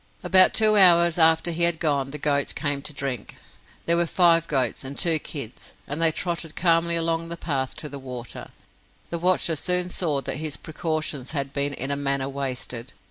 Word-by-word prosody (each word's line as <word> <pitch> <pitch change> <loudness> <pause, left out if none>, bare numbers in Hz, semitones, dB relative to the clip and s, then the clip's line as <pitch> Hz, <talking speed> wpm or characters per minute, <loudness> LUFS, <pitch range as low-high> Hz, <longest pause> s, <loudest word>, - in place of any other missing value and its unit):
About 185 -1 +5
two 215 -1 +5
hours 170 -3 +6
after 160 +1 +4
he 170 +1 -4
had 170 -1 +3
gone, 140 -4 0
the 150 - -5
goats 140 -1 0
came 145 -1 -2
to 155 - -5
drink. 135 -5 -6 0.5
There 170 - +3
were 170 0 +1
five 165 -1 +3
goats 130 -4 -1
and 135 +1 -7
two 165 -2 +3
kids, 135 -6 -7
and 150 +3 -5
they 165 -1 +5
trotted 170 -1 -5
calmly 170 0 +2
along 165 0 -1
the 170 - -5
path 135 -6 -3
to 150 - -5
the 140 -1 -8
water. 125 -3 -8 0.6
The 170 - -3
watcher 175 -2 +2
soon 180 +3 +1
saw 155 -7 -1
that 135 0 -3
his 155 -1 -3
precautions 155 -4 -4
had 140 -2 -3
been 140 0 -1
in 135 +3 -3
a - - 0
manner 140 -1 -1
wasted. 130 -3 -4
155 Hz, 190 wpm, -24 LUFS, 140-170 Hz, 0.6 s, hours